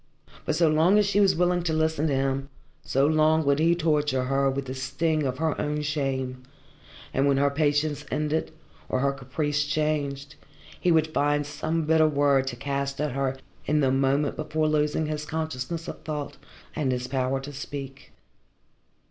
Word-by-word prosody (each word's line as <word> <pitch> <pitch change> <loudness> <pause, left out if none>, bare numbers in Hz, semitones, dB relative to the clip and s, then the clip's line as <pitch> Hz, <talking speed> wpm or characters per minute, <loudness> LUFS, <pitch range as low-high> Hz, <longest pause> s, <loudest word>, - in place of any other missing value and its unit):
But 155 - 0
so 165 0 +4
long 160 +6 +4
as 210 - +4
she 200 +1 +1
was 200 -2 +4
willing 180 +1 +2
to 165 -2 -1
listen 160 -1 +1
to 140 - +1
him, 135 0 -1 0.3
so 135 +1 +2
long 155 +1 +3
would 140 +1 +3
he 165 +2 +4
torture 150 -5 +1
her 135 +1 +1
with 135 0 -3
the 130 - -5
sting 140 +3 -1
of 130 0 -3
her 160 0 -1
own 150 0 -2
shame, 135 -4 -2 0.7
and 135 +1 +2
when 140 -1 +3
her 140 0 +3
patience 145 0 0
ended, 150 +1 -1 0.4
or 130 - 0
her 140 0 +2
caprice 145 +2 -2
changed, 145 -2 -2 0.4
he 180 - +2
would 160 -1 +2
find 145 0 +1
some 155 +2 -2
bitter 160 0 +4
word 140 -2 +2
to 125 - -3
cast 140 +2 -3
at 150 0 0
her 135 0 -1 0.3
in 150 +1 +2
the 135 -2 +3
moment 135 +2 +1
before 155 0 -1
losing 150 +1 +1
his 150 0 -3
consciousness 160 +1 -4
of - - -7
thought 150 -2 -5 0.4
and 145 -4 0
his 125 0 -2
power 130 0 0
to 140 +2 -8
speak. 135 -1 -7
145 Hz, 180 wpm, -26 LUFS, 135-155 Hz, 0.7 s, so